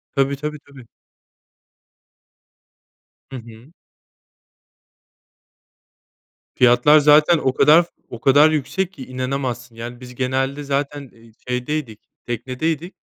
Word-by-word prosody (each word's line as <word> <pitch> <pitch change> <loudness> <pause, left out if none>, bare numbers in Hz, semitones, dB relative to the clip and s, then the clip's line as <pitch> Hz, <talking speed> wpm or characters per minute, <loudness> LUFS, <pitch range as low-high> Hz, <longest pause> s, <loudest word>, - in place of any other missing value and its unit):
Tabii 140 0 +1
tabii 150 +2 -5
tabii. 130 -4 -15 2.4
Hı 135 - -7
hı. 115 +5 -14 2.8
Fiyatlar 125 +5 +5
zaten 150 +3 +5
o 130 -4 -1
kadar 155 +6 +5 0.2
o 120 - -9
kadar 145 +3 +5
yüksek 155 +6 -2
ki 135 -7 -10
inanamazsın. 130 -2 -4
Yani 120 +1 -8
biz 125 -1 -12
genelde 135 +3 -2
zaten, 140 0 -3
eee, 115 0 -20 0.2
şeydeydik 125 -2 -4 0.3
teknedeydik. 135 - -4
135 Hz, 95 wpm, -20 LUFS, 125-150 Hz, 2.8 s, Fiyatlar